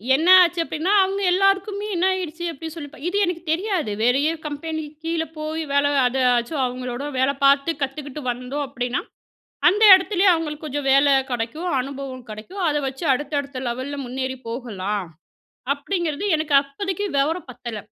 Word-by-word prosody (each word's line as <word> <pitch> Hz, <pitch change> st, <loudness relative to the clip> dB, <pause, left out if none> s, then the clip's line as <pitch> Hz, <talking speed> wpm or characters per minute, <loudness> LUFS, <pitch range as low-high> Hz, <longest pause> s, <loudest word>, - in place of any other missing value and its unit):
என்ன 315 Hz, +5 st, 0 dB
ஆச்சு 350 Hz, -1 st, +2 dB
அப்டின்னா, 325 Hz, +4 st, -2 dB
அவங்க 390 Hz, +1 st, -2 dB
எல்லாருக்குமே 390 Hz, +2 st, +1 dB
என்ன 355 Hz, +1 st, +1 dB
ஆயிடுச்சு 345 Hz, -2 st, -5 dB
அப்டின்னு 320 Hz, +1 st, -8 dB
சொல்லி 290 Hz, -1 st, -9 dB
இது 400 Hz, -, -2 dB
எனக்கு 350 Hz, -1 st, -3 dB
தெரியாது 345 Hz, -, -1 dB
வேறைய 270 Hz, +6 st, +3 dB, 0.2 s
கம்பெனிக்கு 305 Hz, +1 st, -5 dB
கீழ 330 Hz, 0 st, 0 dB
போய் 310 Hz, +1 st, -3 dB
வேலை 280 Hz, 0 st, +3 dB, 0.2 s
அதையாச்சும் 250 Hz, +2 st, +1 dB
அவங்களோட 250 Hz, +1 st, -4 dB, 0.2 s
வேலை 265 Hz, +2 st, +2 dB
பார்த்து 275 Hz, +3 st, +4 dB
கத்துக்கிட்டு 275 Hz, +1 st, -4 dB
வந்தோம் 255 Hz, +4 st, -4 dB
அப்டின்னா. 250 Hz, -1 st, -2 dB, 0.7 s
அந்த 415 Hz, +4 st, +1 dB
இடத்திலேயே 380 Hz, +1 st, +2 dB
அவங்களுக்கு 310 Hz, -2 st, -3 dB
கொஞ்சம் 290 Hz, -1 st, -3 dB
வேல 275 Hz, +1 st, +5 dB, 0.2 s
கெடைக்கும், 245 Hz, +9 st, -3 dB
அனுபவம் 265 Hz, -2 st, -7 dB
கெடைக்கும். 220 Hz, -, -8 dB
அத 295 Hz, -, 0 dB
வச்சு 265 Hz, +5 st, -5 dB
அடுத்த, 285 Hz, +3 st, -3 dB
அடுத்த 280 Hz, -2 st, -8 dB
லெவல்ல 260 Hz, +4 st, -4 dB
முன்னேறி 260 Hz, +1 st, -3 dB
போகலாம். 210 Hz, -5 st, -4 dB, 0.7 s
அப்டிங்கிறது 335 Hz, +2 st, -3 dB
எனக்கு 310 Hz, -2 st, -1 dB
அப்போதைக்கு 380 Hz, +8 st, -4 dB
விவரம் 305 Hz, +3 st, 0 dB
பத்தல. 235 Hz, -3 st, -7 dB
290 Hz, 145 wpm, -22 LUFS, 260-335 Hz, 0.7 s, வேல